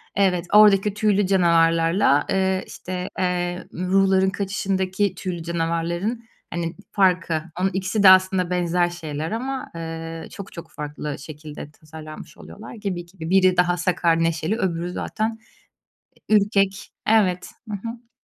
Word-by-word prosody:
Evet, 185 -3 +2
oradaki 210 -1 +6
tüylü 205 -2 +2
canavarlarla, 165 -3 +3
eee, 190 0 +1
işte, 180 0 -6
eee, 180 -1 -1
ruhların 190 +1 +2
kaçışındaki 195 0 -1
tüylü 175 -3 -5
canavarların 170 +7 -2 0.3
hani 170 0 -3 0.2
farkı. 180 -5 +2 0.2
Onun 190 +1 +2
ikisi 190 +2 -1
de 190 - +10
aslında 185 -1 +5
benzer 175 0 +1
şeyler 160 -2 -5
ama, 260 +4 -4
eee, 165 0 -6
çok 200 -2 -9
çok 170 - -10
farklı 150 -1 -6
şekilde 150 0 -9
tasarlanmış 155 0 -11
oluyorlar. 220 - -11
Gibi, 190 -5 -4
gibi. 170 -2 -8
Biri 185 -1 +4
daha 180 0 +3
sakar, 170 -2 +1
neşeli 165 +5 0
öbürü 175 -5 -2
zaten 220 +4 -3 0.9
ürkek. 200 -2 +2 0.2
Evet. 190 -5 +2 0.2
Hı 210 - -3
hı. 235 +1 -10
180 Hz, 130 wpm, -23 LUFS, 165-195 Hz, 0.9 s, de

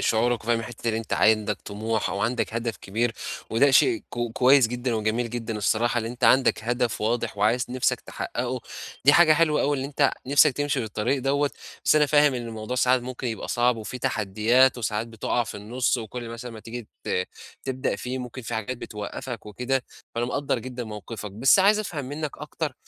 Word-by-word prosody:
شعورك 115 0 +1
وفاهم 115 0 +2
الحتّة 115 0 -8
دي 115 - 0
إن 110 - +1
أنت 115 0 -4
عندك 105 -2 +2
طموح 110 +2 -2
أو 100 - -3
عندك 115 0 -1
هدف 115 -3 -2
كبير، 110 +5 -1 0.4
وده 135 +5 +4
شيء 345 - +5
ك 120 - -5
كويس 130 0 +5
جدًا 120 0 -2
وجميل 110 +2 -1
جدًا 115 -2 -4
الصراحة، 120 +3 +1
إن - - -5
أنت 120 +2 -3
عندك 130 -4 +4
هدف 120 0 0
واضح 115 0 -1
وعايز 115 +4 +2
نفسك 125 0 0
تحقّقه. 125 +1 -4 0.4
دي 145 - +8
حاجة 170 -1 +7
حلوة 155 -1 +3
أوي 145 -1 +1
إن 130 - -3
أنت 140 0 +2 0.2
نفسك 140 +1 +5
تمشي 145 +1 -1
في - - -2
الطريق 110 +6 -1
دوّة. 140 +1 +1 0.3
بس - - +5
أنا 150 -1 +5
فاهم 145 -2 +4
إن 120 -1 -4
الموضوع 110 +2 -5
ساعات 125 0 +3
ممكن 130 0 -5
يبقى 110 -2 -4
صعب، 120 0 +2
وفيه 110 +3 -6
تحديّات 115 +6 +2
وساعات 110 0 -2
بتُقَع 115 +1 -1
في 105 - -7
النُص 120 +6 0
وكل 120 +1 -6
مثلًا 120 +1 -7
ما 110 - -10
تيجي 115 0 -8 0.2
ت 90 - 0 0.4
تبدأ 130 -1 -1
فيه، 125 +1 -4
ممكن 125 0 -7
في 120 - -5
حاجات 110 +3 -3
بتوقّفك 115 +2 -6
وكده، 125 +4 -1 0.3
فأنا 120 +1 0
مقدَّر 130 0 -1
جدًا 125 +1 -6
موقفك. 105 -1 -7
بس 130 - +5
عايز 205 +2 +5
أفهم 165 -9 -4
منّك 145 +2 -5
أكتر، 150 0 -4
120 Hz, 195 wpm, -25 LUFS, 110-130 Hz, 0.4 s, دي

